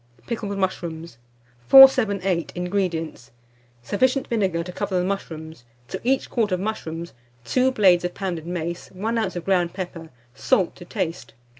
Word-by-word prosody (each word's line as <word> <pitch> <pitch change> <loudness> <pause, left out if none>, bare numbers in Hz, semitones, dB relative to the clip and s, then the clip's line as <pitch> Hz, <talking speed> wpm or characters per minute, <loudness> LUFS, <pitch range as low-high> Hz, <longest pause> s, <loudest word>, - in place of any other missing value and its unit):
PICKLED 205 -4 -4
MUSHROOMS. 170 -7 -4 0.5
478. 200 -10 +6
INGREDIENTS. 175 - -3 0.5
Sufficient 255 - +1
vinegar 190 -7 0
to 180 - -7
cover 195 0 -2
the 180 - +1
mushrooms; 160 -7 -5 0.3
to - - -5
each 260 +2 +1
quart 220 -5 0
of 185 - 0
mushrooms, 170 -5 -5 0.3
2 260 0 +2
blades 185 -7 +4
of 180 0 -3
pounded 175 -5 -4
mace, 175 0 -4
1 220 +5 -2
oz. 190 -5 -2
of 175 - -5
ground 180 -3 +1
pepper, 175 -3 -7 0.2
salt 170 +6 +1
to 175 - -11
taste. 160 -9 -4
180 Hz, 145 wpm, -23 LUFS, 170-205 Hz, 0.5 s, 478